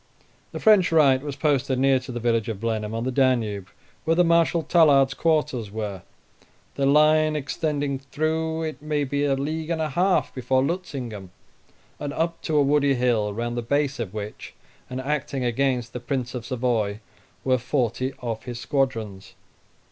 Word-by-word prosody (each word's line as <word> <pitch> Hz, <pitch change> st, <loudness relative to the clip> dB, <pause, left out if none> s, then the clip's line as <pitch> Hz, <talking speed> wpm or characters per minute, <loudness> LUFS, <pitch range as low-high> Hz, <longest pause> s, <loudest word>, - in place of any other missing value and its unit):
The -, -, -5 dB
French 210 Hz, -6 st, +5 dB
right 140 Hz, -5 st, +5 dB
was 145 Hz, -1 st, -5 dB
posted 140 Hz, -3 st, +1 dB
near 135 Hz, 0 st, +3 dB
to 130 Hz, 0 st, -9 dB
the 120 Hz, -, -4 dB
village 115 Hz, -2 st, 0 dB
of 105 Hz, -4 st, -4 dB
Blenheim, 110 Hz, -1 st, -2 dB
on 115 Hz, -, -2 dB
the 130 Hz, -, -1 dB
Danube, 120 Hz, -7 st, +1 dB, 0.4 s
where 165 Hz, 0 st, +2 dB
the 180 Hz, -, +5 dB
Marshal 170 Hz, 0 st, +3 dB
Tallard's 140 Hz, -6 st, +4 dB
quarters 150 Hz, -9 st, 0 dB
were; 105 Hz, -3 st, -5 dB, 0.7 s
their 135 Hz, -1 st, 0 dB
line 155 Hz, +2 st, +4 dB
extending 145 Hz, -1 st, -2 dB
through, 160 Hz, +3 st, -2 dB
it 155 Hz, -2 st, -5 dB
may 150 Hz, -1 st, -1 dB
be 145 Hz, +1 st, -1 dB
a 140 Hz, -1 st, +2 dB
league 155 Hz, +4 st, -3 dB
and 165 Hz, -1 st, -1 dB
a 155 Hz, -1 st, -1 dB
half, 180 Hz, +6 st, +1 dB
before 130 Hz, +1 st, +1 dB
Lutzingen 125 Hz, -, -4 dB, 0.7 s
and 145 Hz, -1 st, -4 dB
up 165 Hz, +2 st, -2 dB
to 155 Hz, -, 0 dB
a 145 Hz, -, +5 dB
woody 140 Hz, -1 st, +3 dB
hill, 120 Hz, -4 st, +1 dB
round 120 Hz, +3 st, -3 dB
the 120 Hz, -, -1 dB
base 140 Hz, +3 st, 0 dB
of 110 Hz, -6 st, -3 dB
which, 105 Hz, 0 st, -7 dB, 0.3 s
and 125 Hz, -, -4 dB
acting 140 Hz, -1 st, -2 dB
against 120 Hz, -1 st, 0 dB
the 125 Hz, -, -4 dB
Prince 125 Hz, 0 st, -3 dB
of 120 Hz, -2 st, -6 dB
Savoy, 115 Hz, -5 st, -1 dB, 0.4 s
were 130 Hz, -1 st, +2 dB
forty 130 Hz, 0 st, -1 dB
of 115 Hz, -1 st, -4 dB
his 120 Hz, -2 st, -6 dB
squadrons. 115 Hz, -9 st, -2 dB
135 Hz, 170 wpm, -24 LUFS, 120-150 Hz, 0.7 s, French